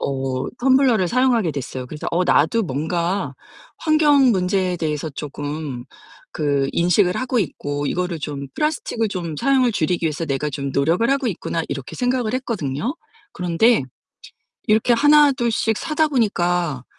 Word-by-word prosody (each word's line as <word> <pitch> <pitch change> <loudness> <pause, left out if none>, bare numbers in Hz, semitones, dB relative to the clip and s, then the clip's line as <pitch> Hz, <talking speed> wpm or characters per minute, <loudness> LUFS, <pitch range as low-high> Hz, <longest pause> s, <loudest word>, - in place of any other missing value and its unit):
어 135 -1 -2
텀블러를 260 -6 +3
사용하게 240 -5 +2
됐어요. 130 -2 -5
그래서 150 +4 -5
'어 180 +2 +1
나도 175 +8 +3
뭔가 170 +4 -2 0.4
환경 295 -4 +4
문제에 185 -1 0
대해서 155 -2 -3
쪼금 145 -2 -6 0.5
그 140 -3 0
인식을 180 +2 +2
하고 255 -1 -1
있고 145 -6 -3
이거를 180 0 -2
좀 145 -2 -5
플라스틱을 300 -7 -1
좀 170 -6 -5
사용을 265 - +2
줄이기 175 -2 0
위해서 155 +1 -2
내가 140 +1 -1
좀 140 0 -4
노력을 165 - +1
하고 275 -1 +1
있구나.' 165 -3 -3
이렇게 135 -2 -6
생각을 245 -3 0
했거든요. 225 - -3 0.4
그런데 180 - +2 0.9
이렇게 220 +3 +3
하나둘씩 260 -5 +3
사다 315 -1 0
보니까 175 - 0
180 Hz, 330 characters per minute, -21 LUFS, 150-245 Hz, 0.9 s, 환경